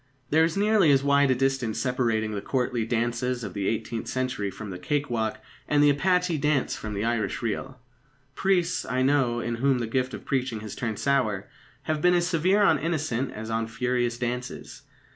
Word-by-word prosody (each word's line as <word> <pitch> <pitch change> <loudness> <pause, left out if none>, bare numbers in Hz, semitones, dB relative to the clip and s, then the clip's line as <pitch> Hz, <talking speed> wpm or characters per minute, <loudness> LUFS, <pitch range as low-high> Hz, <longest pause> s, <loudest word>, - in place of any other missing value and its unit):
There 160 +2 +5
is 165 +3 0
nearly 205 -4 +4
as 135 -1 +3
wide 140 0 +4
a 130 - +4
distance 135 -3 0
separating 115 -4 0
the 100 -1 -3
courtly 125 -2 -1
dances 120 +1 -1
of - - -5
the 100 -2 -2
eighteenth 115 0 -2
century 130 -6 -2
from 105 +1 -8
the 90 - -7
cake 145 +8 -1
walk, 110 -2 -1 0.3
and 145 0 +3
the 145 - +6
apache 180 +2 +1
dance 150 -2 +1
from 105 -1 -6
the 100 - -2
Irish 115 -1 -1
reel. 125 +4 -3 0.5
Priests, 180 0 +1
I 130 +2 -1
know, 130 -4 +2
in 120 0 -3
whom 135 +2 +2
the 120 - -2
gift 130 +3 -1
of - - -11
preaching 125 -5 -1
has 105 -1 -7
turned 115 -5 -3
sour, 125 -9 0 0.4
have 155 -1 -1
been 180 +1 +4
as 175 -1 +2
severe 185 +4 +2
on 160 -7 +4
innocent 145 -6 -1
as 110 +1 -6
on 115 0 -1
furious 120 0 -1
dances. 125 0 -5
125 Hz, 195 wpm, -26 LUFS, 115-145 Hz, 0.5 s, the